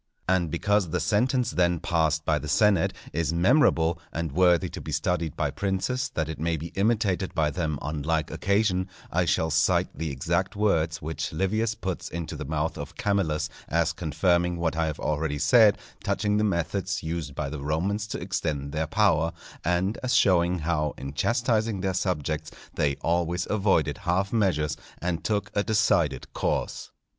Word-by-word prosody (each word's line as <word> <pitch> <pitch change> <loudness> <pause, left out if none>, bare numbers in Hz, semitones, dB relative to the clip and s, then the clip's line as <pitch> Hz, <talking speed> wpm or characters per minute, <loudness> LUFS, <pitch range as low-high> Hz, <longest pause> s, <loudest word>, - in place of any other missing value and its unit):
And 90 -3 +2
because 105 +2 +1
the - - -1
sentence 120 +3 +1
then 85 -1 +2
passed 80 -3 +1
by 75 -2 +2
the 75 - -7
senate 100 +2 +3 0.2
is 80 0 0
memorable, 85 - +3
and 80 -2 -3
worthy 90 +2 +4
to - - -7
be 80 - -6
studied 80 +1 -1
by - - 0
princes 110 +7 -1
that 80 -2 0
it 80 -2 -6
may 80 +1 0
be 80 +3 -6
imitated 100 -3 0
by 75 -2 +2
them 75 -1 -2
on 75 0 -3
like 80 +1 0
occasion, 100 -2 +1 0.2
I 90 0 +2
shall 80 -1 +1
cite 80 +1 +2
the 80 -1 -3
exact 70 -2 -1
words 85 -6 +1
which 80 +1 -3
Livius 110 +7 0
puts 95 -4 -4
into 85 -1 -5
the - - -5
mouth 80 +2 -2
of 70 0 -7
Camillus, 80 -7 0 0.2
as 85 +2 +1
confirming 85 +1 +1
what 85 -1 -1
I 80 0 +1
have 75 - -4
already 75 -1 -1
said 105 - +5 0.3
touching 105 +1 0
the 105 - +2
methods 85 -6 -1
used 80 -3 -4
by 75 -2 -2
the 75 0 -5
Romans 95 +9 -1
to - - -4
extend 75 -6 -2
their 80 +1 -1
power, 85 -4 +2 0.3
and 90 +5 0
as 125 -1 0
showing 90 -6 +4
how 75 -2 -1
in 70 +1 -6
chastising 115 - +1
their 95 0 0
subjects 80 -5 -1 0.2
they 70 -2 +1
always 85 +1 0
avoided 95 -9 +1
half 95 +3 0
measures 90 -9 +1 0.2
and 85 -2 -2
took 105 0 -1
a 100 - +2
decided 95 - +1
course. - - -2
85 Hz, 170 wpm, -26 LUFS, 80-100 Hz, 0.3 s, said